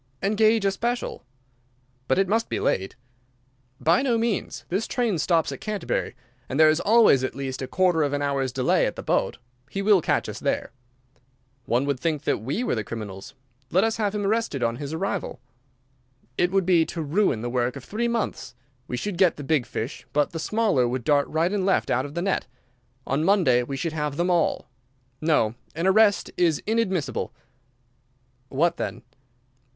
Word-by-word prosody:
"Engage 215 +1 +3
a 195 - +3
special." 240 +5 -3 0.8
"But 130 - +2
it 195 0 +3
must 225 +4 0
be - - -1
late." 95 +1 -1 0.8
"By 170 +8 +3
no 250 -4 +1
means. 225 -3 -2
This 195 +5 -1
train 230 -9 0
stops 165 0 +2
at - - -7
Canterbury; 215 -2 -2 0.3
and 135 - -2
there 155 -1 +7
is 155 - 0
always 215 - +5
at 130 - -3
least 135 -1 -4
a 130 - -3
quarter 180 -1 +2
of 145 -2 +1
an 145 0 -1
hour's 135 -2 0
delay 125 0 +2
at - - -4
the - - -7
boat. - - 0 0.3
He 195 - -3
will 200 -3 +5
catch - - 0
us - - -6
there." - - -1 0.9
"One 125 +4 +1
would 140 -3 -1
think 155 -2 -1
that - - 0
we 140 - -2
were - - 0
the 110 - -1
criminals. 100 0 -7 0.3
Let 185 +7 +3
us 225 0 0
have 210 -2 -1
him 205 -1 -1
arrested 210 - 0
on 115 0 0
his 140 +1 -5
arrival." 190 - -3 1.0
"It 175 - +2
would 195 -1 +1
be 175 -3 +4
to 165 - -4
ruin 150 - +1
the - - -2
work 125 0 0
of 140 - -8
three 230 - -2
months. 230 - -3 0.3
We 125 - -3
should 195 +4 -4
get 185 -4 +4
the 145 - -8
big 140 -3 +1
fish, 120 +6 -5
but 145 0 +2
the 165 - -5
smaller 200 - +1
would 125 0 -3
dart 145 +2 +3
right 165 +4 0
and 200 -2 0
left 190 0 +1
out 130 +3 +1
of 145 - -12
the 170 - -1
net. 195 0 0 0.6
On 140 +3 0
Monday 165 -10 +4
we 135 +3 -4
should 165 +2 -2
have 150 -2 -2
them 175 +1 +1
all. 170 -2 +1 0.5
No, 150 -9 +2 0.2
an 165 +3 -2
arrest 200 0 +4
is 165 -4 +3
inadmissible." 190 - -1 1.2
"What 170 +5 +1
then?" - - -4
165 Hz, 190 wpm, -25 LUFS, 135-200 Hz, 1.2 s, there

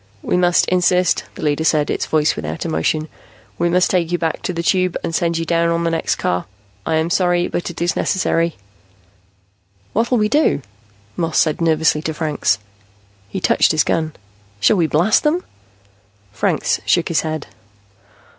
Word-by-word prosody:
"We - - 0
must 180 -1 +3
insist," 180 -1 +2
the - - -8
leader 150 +1 0
said, 155 -2 +2
its - - -2
voice 155 -1 +2
without 80 +1 -5
emotion. 80 - -1 0.5
"We 170 0 +2
must 180 +1 +2
take 175 -3 0
you 175 - +1
back 165 -2 -2
to - - -2
the 170 -1 -3
Tube 185 -1 +1
and 165 - -3
send 170 0 0
you 165 - -2
down 170 0 +1
on 170 0 0
the 165 - 0
next 165 - 0
car. 90 +2 -2 0.4
I 160 - +1
am 160 +2 0
sorry, 175 -1 +2
but 175 - -3
it 175 - -8
is 175 - 0
necessary." 170 -3 0 1.4
"What'll 235 +3 +1
we 210 -1 +2
do?" 290 - +2 0.5
Moss 165 -2 -1
said 155 0 +2
nervously 160 -1 +2
to 160 0 -4
Franks. 150 -9 0 0.7
He 190 - -4
touched - - +3
his 155 - +3
gun. 160 -1 -1 0.5
"Shall 150 - +3
we 165 -3 +2
blast 175 +9 +3
them?" 320 +4 0 0.9
Franks - - 0
shook 170 - +2
his 165 - +2
head. 155 -2 -4
165 Hz, 175 wpm, -19 LUFS, 155-180 Hz, 1.4 s, must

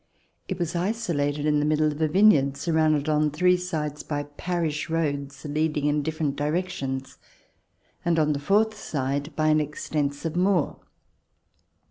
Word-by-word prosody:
It - - -3
was 175 -1 -2
isolated 170 -7 -1
in 150 -1 +3
the - - +1
midst 155 0 +2
of 150 0 0
a 155 - +3
vineyard 150 -6 +4
surrounded 155 -3 +1
on 150 0 +2
three 180 +5 +3
sides 155 -5 -3
by 145 -1 -3
parish 155 +1 -3
roads 140 -4 -2
leading 150 0 0
in 150 0 +2
different 155 -1 -2
directions, 145 -4 -3 0.8
and 170 -1 +1
on 150 -1 +3
the 140 - -3
fourth 215 +8 +2
side 140 -5 -3
by 155 0 +2
an 155 0 +4
extensive 150 +1 -2
moor. 180 -3 +1
155 Hz, 145 wpm, -25 LUFS, 145-170 Hz, 0.8 s, vineyard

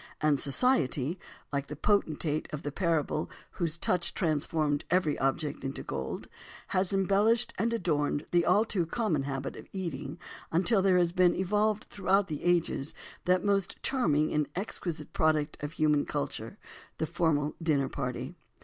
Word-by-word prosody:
And 150 -2 +3
"society," 150 - +1 0.3
like 140 0 -1
the 150 - -6
potentate 155 -4 0
of 150 0 -5
the 145 - -3
parable 160 -2 0 0.2
whose 170 -3 -2
touch 175 +1 0
transformed 155 -3 0
every 175 -4 +2
object 135 +3 -1
into 135 0 -4
gold, 65 0 -4 0.4
has 185 +1 +1
embellished 200 +4 +2
and 230 +3 +1
adorned 150 -8 0
the 175 -1 +4
all 210 +5 +4
too 180 -7 -1
common 175 - 0
habit 135 -1 -4
of - - -10
eating, 160 -5 -4 0.3
until 190 +5 +3
there 185 -1 +4
has 175 -1 +3
been 180 -1 +4
evolved 210 +3 +1
throughout 195 0 +1
the 150 -2 -4
ages 170 -5 +1 0.3
that 180 +1 +3
most 200 -2 +1
charming 155 - +2
and 150 -1 +1
exquisite 180 -4 -4
product 155 -1 +2
of 145 +2 -4
human 150 -2 +2
culture—the - - -5
formal 150 -3 0
dinner 145 -5 +2
party. 125 -2 -4
165 Hz, 150 wpm, -30 LUFS, 145-190 Hz, 0.4 s, the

